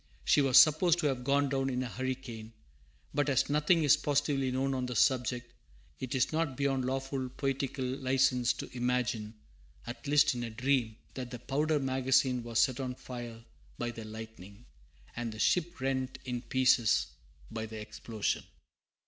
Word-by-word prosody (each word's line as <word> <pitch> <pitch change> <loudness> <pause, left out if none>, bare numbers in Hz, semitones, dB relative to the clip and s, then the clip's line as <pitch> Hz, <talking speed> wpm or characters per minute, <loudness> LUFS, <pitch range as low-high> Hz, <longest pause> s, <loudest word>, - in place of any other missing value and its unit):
She 145 - +5
was 135 -3 +4
supposed 160 +2 +6
to - - -2
have 130 -4 0
gone 140 +2 +2
down 135 -1 0
in 130 0 -1
a - - -3
hurricane, 120 -2 -5 0.6
but 145 -1 +1
as 140 +1 +2
nothing 150 +3 +3
is 145 - +6
positively 140 -2 0
known 135 +2 0
on 130 -1 -2
the 125 - -5
subject, 125 -1 +1 0.5
it 130 +1 -4
is 130 - +2
not 155 -4 -1
beyond 135 -2 0
lawful 135 0 -2
poetical 135 0 -2
license 130 -1 +2
to - - -8
imagine, 120 -3 -1 0.5
at 120 +5 -8
least 145 0 +4
in 120 -1 -4
a 115 - -4
dream, 125 -1 0 0.2
that 125 -2 -6
the 125 - -6
powder 150 +5 0
magazine 130 -1 +2
was 115 -1 -4
set 125 +2 +3
on 130 -2 -3
fire 120 -3 -8 0.3
by 120 - -2
the 115 -1 -8
lightning, 110 -1 -10 0.5
and 120 -1 -3
the - - -9
ship 175 +9 +1
rent 130 0 -2
in 125 -2 -3
pieces, 125 -2 +3 0.5
by 110 0 -4
the 110 0 -8
explosion. 105 0 -3
130 Hz, 165 wpm, -31 LUFS, 120-135 Hz, 0.6 s, supposed